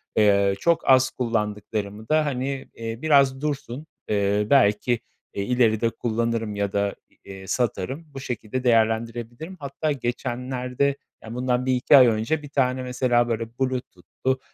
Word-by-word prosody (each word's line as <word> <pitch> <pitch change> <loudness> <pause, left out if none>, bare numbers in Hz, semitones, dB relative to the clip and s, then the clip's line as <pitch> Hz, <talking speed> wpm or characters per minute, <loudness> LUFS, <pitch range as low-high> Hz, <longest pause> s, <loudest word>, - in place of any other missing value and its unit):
Eee, 100 -2 +4
çok 170 +2 +1
az 130 0 +6
kullandıklarımı 105 -3 -3
da, 155 0 +3
hani, 135 -1 -3
eee, 115 0 -6
biraz 140 -3 +4
dursun, 145 -1 -4 0.2
eee, 105 0 +1
belki, 115 -2 +3 0.3
eee, 100 - -2
ileride 115 -1 +2
kullanırım 115 -2 -2
ya 100 -1 -1
da, 100 0 0 0.3
eee, 95 -1 -10
satarım. 125 - -2
Bu 135 - -6
şekilde 125 -1 -4
değerlendirebilirim. 115 +6 0
Hatta 140 +2 -2
geçenlerde, 125 +1 -2 0.3
ya, 110 - -8
bundan 125 0 0
1-2 130 +2 +5
ay 125 - +8
önce 115 +7 0
bir 145 - -10
tane 130 -2 0
mesela, 125 -1 +1
böyle, 115 0 -1 0.2
Bluetooth'lu, 130 0 -2
120 Hz, 135 wpm, -24 LUFS, 110-130 Hz, 0.3 s, ay